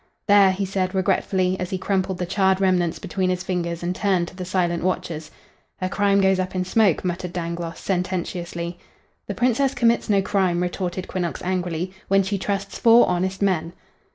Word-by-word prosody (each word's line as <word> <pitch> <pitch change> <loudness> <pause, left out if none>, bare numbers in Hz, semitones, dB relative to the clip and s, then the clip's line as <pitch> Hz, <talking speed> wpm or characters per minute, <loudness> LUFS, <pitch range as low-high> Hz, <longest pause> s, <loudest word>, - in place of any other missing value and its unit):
"There!" 200 -2 +6
he 195 +1 -2
said, 190 0 -2
regretfully, 185 0 +1
as 180 -1 -3
he 190 - -2
crumpled 190 -1 -1
the 180 - -2
charred 190 +1 +2
remnants 180 -3 +1
between 190 -1 -2
his 180 0 -1
fingers 170 -2 -3
and 180 +1 -1
turned 185 -4 +1
to - - -16
the 185 -1 -5
silent 175 -2 0
watchers. 175 -4 -2 0.5
"Her 185 - -2
crime 200 0 +2
goes 190 -1 +3
up 185 0 -3
in 185 0 0
smoke," 190 -2 +2
muttered 180 0 -3
Dangloss, 170 -1 -4
sententiously. 175 -2 -3 0.5
"The - - -4
Princess 255 +3 +1
commits 235 -1 +2
no 200 -2 +3
crime," 185 -3 +1
retorted 180 0 -3
Quinnox, 175 -3 -3
angrily, 180 -1 -2
"when 195 0 +4
she 195 +1 -2
trusts 200 +1 -3
four 235 +1 +6
honest 185 +2 -1
men." 170 -4 0
185 Hz, 180 wpm, -23 LUFS, 175-195 Hz, 0.5 s, There